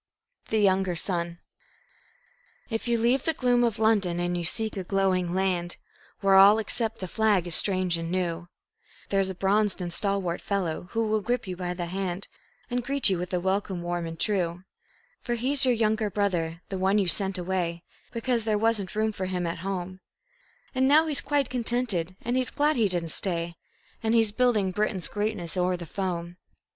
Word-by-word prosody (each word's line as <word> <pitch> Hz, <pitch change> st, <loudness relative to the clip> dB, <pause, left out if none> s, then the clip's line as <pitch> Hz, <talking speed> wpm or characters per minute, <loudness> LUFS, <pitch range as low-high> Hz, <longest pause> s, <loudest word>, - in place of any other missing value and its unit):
The 220 Hz, -, +1 dB
Younger 190 Hz, -3 st, +2 dB
Son 170 Hz, -1 st, 0 dB, 1.3 s
If 225 Hz, +2 st, -2 dB
you 235 Hz, 0 st, +2 dB
leave 240 Hz, +4 st, +2 dB
the 325 Hz, +1 st, 0 dB
gloom 245 Hz, -2 st, +2 dB
of 230 Hz, -3 st, +1 dB
London 205 Hz, -6 st, +2 dB
and 175 Hz, 0 st, -1 dB
you 175 Hz, -, -2 dB
seek 220 Hz, +6 st, -1 dB
a 190 Hz, -, -3 dB
glowing 185 Hz, -2 st, +1 dB
land, 180 Hz, -2 st, -1 dB, 0.4 s
Where 195 Hz, -1 st, +3 dB
all 195 Hz, +2 st, +8 dB
except 220 Hz, +1 st, -1 dB
the 185 Hz, -, -5 dB
flag 210 Hz, -2 st, +2 dB
is 175 Hz, -, -3 dB
strange 185 Hz, -2 st, +2 dB
and 165 Hz, 0 st, -4 dB
new, 175 Hz, -1 st, -2 dB, 0.6 s
There's 195 Hz, -1 st, +1 dB
a 190 Hz, -, -5 dB
bronzed 200 Hz, +2 st, +1 dB
and 175 Hz, -2 st, -4 dB
stalwart 195 Hz, -3 st, +1 dB
fellow 180 Hz, -4 st, -2 dB
who 225 Hz, 0 st, +1 dB
will 215 Hz, 0 st, +1 dB
grip 240 Hz, +2 st, -1 dB
you 185 Hz, -1 st, -5 dB
by 180 Hz, 0 st, -4 dB
the 175 Hz, -1 st, -3 dB
hand, 185 Hz, +1 st, -3 dB, 0.4 s
And 245 Hz, 0 st, -2 dB
greet 275 Hz, -4 st, +3 dB
you 185 Hz, -, 0 dB
with 180 Hz, 0 st, -4 dB
a 180 Hz, -, 0 dB
welcome 190 Hz, -1 st, -1 dB
warm 175 Hz, -1 st, -2 dB
and 165 Hz, 0 st, -8 dB
true; 180 Hz, -4 st, 0 dB, 0.6 s
For 240 Hz, -, -2 dB
he's 265 Hz, +4 st, +3 dB
your 250 Hz, -, +4 dB
younger 220 Hz, -1 st, +1 dB
brother, 175 Hz, -4 st, -1 dB
the 190 Hz, -, -3 dB
one 190 Hz, +2 st, +2 dB
you 200 Hz, -3 st, +2 dB
sent 190 Hz, +2 st, +2 dB
away 175 Hz, -2 st, -2 dB, 0.3 s
Because 235 Hz, 0 st, -1 dB
there 215 Hz, -1 st, +1 dB
wasn't 210 Hz, -4 st, 0 dB
room 220 Hz, 0 st, +1 dB
for 190 Hz, -3 st, -4 dB
him 180 Hz, -1 st, -2 dB
at 170 Hz, 0 st, -3 dB
home; 185 Hz, 0 st, -4 dB, 0.7 s
And 260 Hz, 0 st, +2 dB
now 305 Hz, +3 st, +6 dB
he's 300 Hz, -3 st, -2 dB
quite 290 Hz, -2 st, +1 dB
contented, 230 Hz, -8 st, -1 dB
and 240 Hz, +2 st, 0 dB
he's 255 Hz, -1 st, 0 dB
glad 300 Hz, +2 st, +1 dB
he 225 Hz, -5 st, +3 dB
didn't 175 Hz, -2 st, -1 dB
stay, 170 Hz, 0 st, -1 dB, 0.5 s
And 225 Hz, 0 st, +1 dB
he's 225 Hz, -2 st, +4 dB
building 220 Hz, -4 st, +2 dB
Britain's 205 Hz, -2 st, -1 dB
greatness 205 Hz, -6 st, -3 dB
o'er 180 Hz, 0 st, +1 dB
the 170 Hz, -, -7 dB
foam. 175 Hz, -1 st, -4 dB
195 Hz, 190 wpm, -27 LUFS, 175-220 Hz, 1.3 s, all